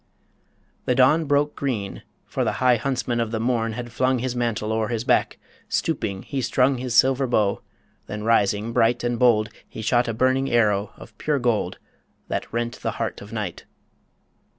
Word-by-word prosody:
The 125 - +2
dawn 150 +6 +4
broke 145 +1 +1
green 115 -8 -3 0.2
For - - -2
the - - 0
high 125 -1 +3
huntsman 125 -1 -1
of 115 -1 0
the 110 0 -2
morn 115 -1 0
had 120 +1 -6
flung 130 +2 +1
His 125 0 -2
mantle 115 -3 -1
o'er 110 -1 0
his 115 -1 -2
back: - - +2 0.3
stooping, 110 -12 -1
he 135 -2 -3
strung 125 +2 +2
His 125 -2 -3
silver 130 +2 +4
bow; 105 -4 +1 0.5
then 105 0 -5
rising, 110 0 +2
bright 120 +2 +2
and 120 -1 -1
bold, 110 -4 +4 0.2
He 110 - -7
shot 120 +2 +2
a 115 - -1
burning 130 +3 +2
arrow 105 -3 +2
of 110 - -13
pure 150 -1 0
gold 120 -4 0 0.5
That - - -3
rent 120 0 -3
the - - -2
heart - - -3
of 100 +1 -11
Night. 105 -6 -5
120 Hz, 175 wpm, -23 LUFS, 110-130 Hz, 0.5 s, dawn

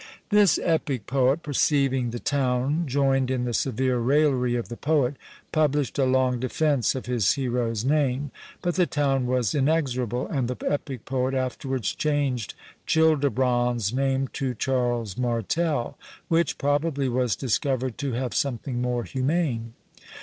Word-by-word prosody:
This 205 -4 +5
epic 145 -8 0
poet 135 +4 +1
perceiving 135 -3 +1
the 120 - -4
town 140 +4 0
joined 135 -1 +1
in 130 -1 0
the 120 - -2
severe 130 +1 0
raillery 130 -1 +2
of 120 - -2
the 120 - -6
poet, 145 -1 +1 0.4
published 145 -3 +1
a 135 - +4
long 130 -1 +2
defence 135 +1 +1
of 130 - -5
his 120 -5 +2
hero's 120 -4 -1
name; 140 -1 +1 0.3
but 175 - 0
the 180 0 +2
town 135 -3 0
was 125 -4 +1
inexorable, 130 -5 0
and 135 -5 -1
the 125 - -4
epic 140 -4 -3
poet 130 0 -1
afterwards 130 -2 -2
changed 140 -7 -1 0.3
Childebrand's 130 -7 +2
name 135 0 +1
to 130 -3 -3
Charles 120 -4 -1
Martel, 125 - -1 0.3
which 165 -2 +1
probably 145 -1 0
was 125 -4 +1
discovered 130 +1 -1
to 140 -3 -2
have 125 0 -2
something 125 -2 -2
more 125 -1 -1
humane. 130 -4 -1
130 Hz, 140 wpm, -25 LUFS, 125-145 Hz, 0.4 s, This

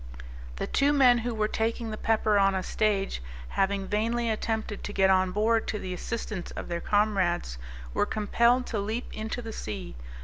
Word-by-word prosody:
The - - -3
two 280 +1 +2
men 250 -4 +6
who 235 0 -3
were 215 -1 +1
taking 225 +1 -1
the - - -3
pepper 215 -1 +2
on 195 -1 +4
a 185 - -1
stage, 200 - 0 0.3
having 195 0 0
vainly 230 +3 0
attempted 220 -1 -2
to 205 - -5
get 190 -1 +4
on 185 -1 +3
board 220 +3 +2
to 215 - -1
the 185 -2 -5
assistance 205 -1 -4
of - - -7
their 170 0 -2
comrades, 190 - +1 0.3
were - - +1
compelled 235 +4 +2
to 220 - -2
leap 220 +5 -3
into 220 +3 -4
the 225 -1 -6
sea. 195 -3 -6
215 Hz, 180 wpm, -28 LUFS, 195-230 Hz, 0.3 s, men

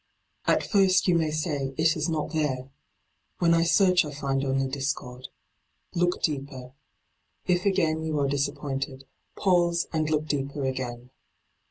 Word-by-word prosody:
At - - +3
first 190 -3 +3
you 180 - +4
may 165 -2 +2
say 150 -4 -2
it 160 +1 +3
is 155 +1 -1
not 155 -1 -2
there; 135 -4 -1 0.7
when 170 -1 +3
I 165 - +4
search 180 +2 +4
I 150 - -6
find 140 -2 -2
only 135 0 0
discord. 130 -2 -4 0.7
Look 175 0 0
deeper. 135 -4 -3 0.7
If 180 +1 +1
again 165 -5 +1
you 160 -1 -2
are 140 - +2
disappointed, 135 -1 -3 0.3
pause 175 -2 +2
and 155 -1 0
look 155 -1 +1
deeper 140 -1 -2
again. 125 -1 -4
150 Hz, 145 wpm, -26 LUFS, 135-170 Hz, 0.7 s, you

